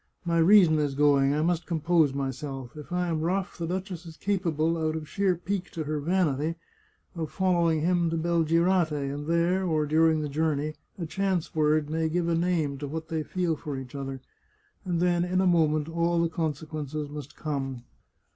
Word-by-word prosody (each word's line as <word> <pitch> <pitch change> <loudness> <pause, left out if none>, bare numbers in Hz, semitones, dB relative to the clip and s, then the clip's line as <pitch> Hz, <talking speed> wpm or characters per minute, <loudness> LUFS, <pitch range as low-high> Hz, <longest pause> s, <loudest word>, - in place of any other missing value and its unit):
" - - -41
My 170 -1 +2
reason 170 -3 +6
is 145 -2 0
going. 140 -1 +4
I 155 - +1
must 175 0 0
compose 165 -2 +2
myself. 135 -1 -5
If 150 +3 -10
I 180 0 0
am 160 -2 -1
rough 185 +3 -1
the 165 - -2
duchess 185 -1 -4
is 160 -1 -11
capable, 165 -5 0
out 160 -1 -1
of 155 -1 -5
sheer 195 +1 +1
pique 180 +2 -3
to 160 - -3
her 150 0 -2
vanity, 160 -2 0 0.6
of 160 -3 -3
following 170 -4 +2
him 175 0 +2
to 165 - -1
Belgirate, 170 +1 +2 0.2
and 145 +1 -6
there, 170 +3 +2
or 155 -4 +1
during 160 +1 +3
the 150 - -2
jour 155 +2 0
ney, 150 +2 -3 0.2
a 175 - -3
chance 190 0 -1
word 155 -1 +2
may 160 0 0
give 170 +1 0
a 170 - +1
name 165 -5 0
to 145 - -4
what 160 +2 -5
they 160 -1 -1
feel 170 +1 -1
for 145 -2 -5
each 130 -2 -8
other; 135 -2 -5 0.6
and 175 -2 -1
then, 175 -1 +2
in 180 +1 0
a 190 - +3
moment, 155 -4 +3
all 170 +1 +1
the 170 0 +2
consequences 155 -2 -3
must 145 -1 -8
come. 135 -5 -4
160 Hz, 195 wpm, -27 LUFS, 150-175 Hz, 0.6 s, reason